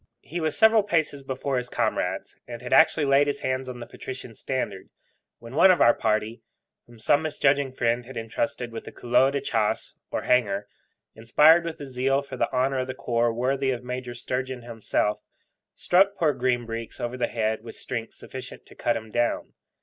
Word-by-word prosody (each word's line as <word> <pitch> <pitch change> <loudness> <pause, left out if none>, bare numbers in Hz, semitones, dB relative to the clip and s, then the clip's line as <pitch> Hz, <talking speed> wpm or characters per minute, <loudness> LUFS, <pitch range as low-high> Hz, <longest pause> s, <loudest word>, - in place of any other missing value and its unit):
He 170 +4 -5
was 155 -2 -1
several 220 0 +6
paces 160 -7 0
before 135 0 -2
his 125 0 -3
comrades, - - -1
and 120 0 -8
had 125 - -2
actually 160 -1 +5
laid 140 +1 +4
his 145 - -2
hands 130 0 -2
on 125 -1 -7
the 120 - -7
patrician 125 -2 -8
standard, 110 -4 -4 0.5
when 115 +1 -12
one 190 +6 +6
of 185 - +5
our 120 - +6
party, 110 +1 -1 0.5
whom 120 -1 -16
some 145 +7 +3
misjudging 140 -3 +1
friend 120 -1 0
had 130 -2 -9
entrusted 120 +2 -3
with 115 - -8
a - - -6
couleau 125 +2 +3
de 140 0 -1
chasse, 110 -2 -1 0.2
or - - -3
hanger, 105 -5 +1 0.5
inspired 150 +9 +5
with 165 -1 -5
a - - -5
zeal 135 +1 0
for 135 -2 -8
the - - -1
honour 130 +1 +1
of 130 - -2
the 130 - -5
corps 120 0 +1
worthy 130 +3 0
of 125 -2 -2
Major 125 -1 -5
Sturgeon 130 0 -4
himself, 110 -2 -1 0.5
struck 195 +3 +3
poor 160 -5 +2
Green 125 -1 0
Breeks 115 0 -6
over 120 +1 -3
the 125 - 0
head 110 -1 -1
with 115 - -9
strength 115 -3 -5
sufficient 130 -1 -9
to - - -15
cut 120 - 0
him 110 -1 -9
down. 120 +1 -1
125 Hz, 195 wpm, -25 LUFS, 115-140 Hz, 0.5 s, several